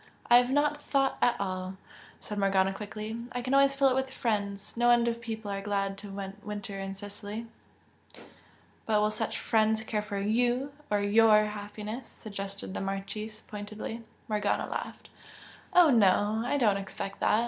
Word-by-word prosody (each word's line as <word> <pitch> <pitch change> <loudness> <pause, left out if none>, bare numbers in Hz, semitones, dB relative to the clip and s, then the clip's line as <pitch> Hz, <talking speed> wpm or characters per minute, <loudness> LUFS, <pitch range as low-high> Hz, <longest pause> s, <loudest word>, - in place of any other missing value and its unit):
"I 240 - +10
have 245 0 +3
not 290 +2 +2
thought 270 -2 +1
at 245 - +3
all" 185 0 -3 0.4
said 210 -1 -5
Morgana, 195 -1 +3
quickly, 215 +3 -6
"I 245 0 -3
can 255 +2 -1
always 275 0 +5
fill 275 -1 +4
it - - +2
with 265 +1 0
friends. 205 -5 -2
No 240 +1 +3
end 240 0 +5
of 235 0 -1
people 220 -3 -5
are 195 0 -3
glad 195 -1 -1
to 205 - -9 0.3
winter 205 -1 -5
in 195 0 -4
Sicily." 205 +3 -6 1.4
"But 215 -1 +3
will 210 0 +2
such 220 0 -2
'friends' 220 0 +2
care 215 -1 -1
for 205 -1 -5
YOU 245 +7 +1 0.2
or 205 -1 +2
YOUR 215 +1 +5
happiness?" 210 +3 -6
suggested 200 -2 -7
the - - -3
Marchese, 205 +3 -5
pointedly. 215 +2 -6 0.3
Morgana 210 -2 0
laughed. - - -6 0.6
"Oh, 350 -4 +7
no, 210 -1 +4
I 285 - +1
do 255 - +2
not 205 -2 +4
expect 195 0 -6
that! 215 - +3
215 Hz, 170 wpm, -29 LUFS, 200-235 Hz, 1.4 s, I